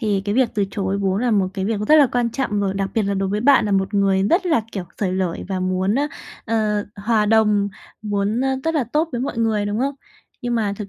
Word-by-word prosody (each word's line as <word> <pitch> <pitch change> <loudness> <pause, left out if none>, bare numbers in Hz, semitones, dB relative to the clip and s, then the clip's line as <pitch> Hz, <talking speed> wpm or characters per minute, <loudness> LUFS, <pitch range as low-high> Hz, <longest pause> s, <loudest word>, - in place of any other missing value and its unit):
Thì 205 -4 0
cái 205 0 -1
việc 255 0 +3
từ 205 - +1
chối 195 0 -2
vốn 195 -1 0
là 250 - +1
một 200 -4 +2
cái 190 -2 -2
việc 215 +1 -1
nó 210 - -2
rất 310 - +6
là 290 -3 +7
quan 240 -1 0
trọng 230 -5 -1
rồi, 195 -1 -1
đặc 195 0 -2
biệt 225 - +2
là 200 0 -1
đối 195 0 -1
với 205 +2 -1
bạn 270 -2 +4
là 205 - -1
một 195 +1 0
người 195 -1 +2
rất 365 +2 +2
là, 315 -8 +3
kiểu, 195 -3 -4
xởi 190 -3 0
lởi 185 -2 -2
và 190 -2 -2
muốn, 185 +2 0
ờ, 285 +3 +1 0.4
ờ, 215 -2 0
hòa 210 +1 +1
đồng, 210 -2 +3 0.3
muốn 205 +2 -1 0.2
rất 325 0 0
là 290 -5 +1
tốt 300 +8 0
với 240 - -2
mọi 250 -2 -3
người, 220 -2 +1
đúng 205 +1 -2
không? 275 +3 -1 0.5
Nhưng 240 -1 -1
mà 215 -3 0
thực 210 -1 -6
210 Hz, 265 wpm, -21 LUFS, 195-235 Hz, 0.5 s, là